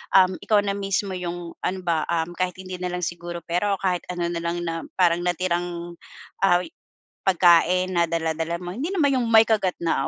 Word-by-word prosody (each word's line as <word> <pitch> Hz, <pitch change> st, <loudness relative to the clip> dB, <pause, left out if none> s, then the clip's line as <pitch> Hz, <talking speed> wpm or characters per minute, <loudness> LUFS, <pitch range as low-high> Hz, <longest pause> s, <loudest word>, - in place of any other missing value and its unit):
um, 185 Hz, -1 st, +5 dB
ikaw 210 Hz, -2 st, +2 dB
na 200 Hz, -, 0 dB
mismo 195 Hz, 0 st, -1 dB
yung 175 Hz, -2 st, -5 dB
ano 190 Hz, +1 st, -2 dB
ba, 165 Hz, -3 st, 0 dB
um, 170 Hz, 0 st, -1 dB
kahit 185 Hz, -1 st, 0 dB
hindi 185 Hz, -1 st, -8 dB
na 180 Hz, -, -2 dB
lang 180 Hz, 0 st, -4 dB
siguro 175 Hz, 0 st, -5 dB
pera 180 Hz, +4 st, 0 dB
o -, -, -15 dB
kahit 180 Hz, -2 st, 0 dB
ano 175 Hz, -1 st, -2 dB
na 170 Hz, -, -2 dB
lang 170 Hz, +1 st, -2 dB
na 165 Hz, -1 st, -4 dB
parang 175 Hz, -2 st, +3 dB
natirang 175 Hz, -1 st, -2 dB, 0.4 s
ah 180 Hz, -2 st, +4 dB
wi 170 Hz, -, -11 dB, 0.6 s
pagkain 180 Hz, 0 st, +4 dB
na 170 Hz, 0 st, +3 dB
dala-dala 165 Hz, 0 st, -1 dB
mo. 175 Hz, -, -5 dB
Hindi 275 Hz, +8 st, -2 dB
naman 285 Hz, -7 st, +2 dB
yung 240 Hz, -, -1 dB
may 225 Hz, -1 st, +7 dB
kagat 200 Hz, -5 st, +1 dB
na, 160 Hz, -5 st, +1 dB
175 Hz, 205 wpm, -24 LUFS, 170-185 Hz, 0.6 s, may